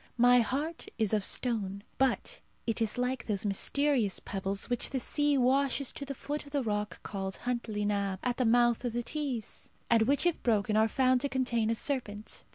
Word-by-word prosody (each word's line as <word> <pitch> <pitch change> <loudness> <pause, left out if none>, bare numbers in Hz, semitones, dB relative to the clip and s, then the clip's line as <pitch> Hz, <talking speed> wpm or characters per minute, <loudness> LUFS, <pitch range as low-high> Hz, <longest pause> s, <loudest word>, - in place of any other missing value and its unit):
My 245 +1 +6
heart 290 +8 -2
is 220 -2 +1
of 210 -2 +2
stone, 200 -4 -1 0.2
but 265 - 0 0.3
it 230 0 -1
is 225 0 0
like 250 0 -1
those 205 -2 -1
mysterious 235 +1 +1
pebbles 195 0 -3
which 245 -1 0
the 265 - -2
sea 290 +3 +2
washes 270 +1 +2
to 280 - -6
the 275 0 -5
foot 295 +3 -4
of 285 - -12
the 280 -2 0
rock 210 -2 -3
called 195 -1 -4
Huntly 235 -4 -2
Nabb, 200 -2 0
at 245 -1 0
the 255 - +2
mouth 240 +1 +3
of 240 -2 -2
the 240 0 -1
Tees, 265 -5 -4 0.2
and 230 -1 +5
which 280 +5 +2
if 350 -2 +1
broken 215 -3 +1
are 220 +1 +4
found 255 +2 +2
to 280 - -1
contain 240 -4 0
a 230 - +1
serpent. 220 -5 -3
240 Hz, 195 wpm, -30 LUFS, 210-265 Hz, 0.3 s, My